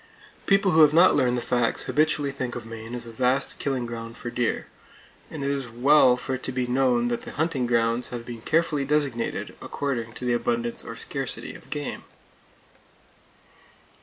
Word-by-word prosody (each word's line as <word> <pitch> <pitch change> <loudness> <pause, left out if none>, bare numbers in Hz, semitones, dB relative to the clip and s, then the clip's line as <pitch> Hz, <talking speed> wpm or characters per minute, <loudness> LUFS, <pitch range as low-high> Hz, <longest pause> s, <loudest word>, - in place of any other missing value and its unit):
People 195 -1 +4
who 160 - +6
have 150 0 +6
not 175 +3 +7
learned 125 -3 +2
the 120 - -3
facts 120 -2 0
habitually 150 -2 +1
think 130 -3 -4
of 120 - -6
Maine 115 +1 -7
as 120 - -5
a 115 - -9
vast 125 +3 0
killing 135 -3 -1
ground 115 0 -7
for 120 - -6
deer; 120 -1 -1 0.6
and 155 -3 -6
it 140 - 0
is 135 -3 -3
well 125 +1 +5
for 130 +1 -4
it 130 - -3
to 130 - -3
be 125 0 -1
known 125 -1 +2
that 120 - -2
the - - -9
hunting 150 -6 0
grounds 115 0 +1
have 120 -2 -6
been 120 -2 -7
carefully 160 0 +1
designated, 140 -5 -1
according 120 -5 -3
to 125 - -6
the 120 - +2
abundance 120 0 -1
or - - -7
scarcity - - -5
of - - -14
game. 145 0 -4
125 Hz, 185 wpm, -25 LUFS, 120-140 Hz, 0.6 s, not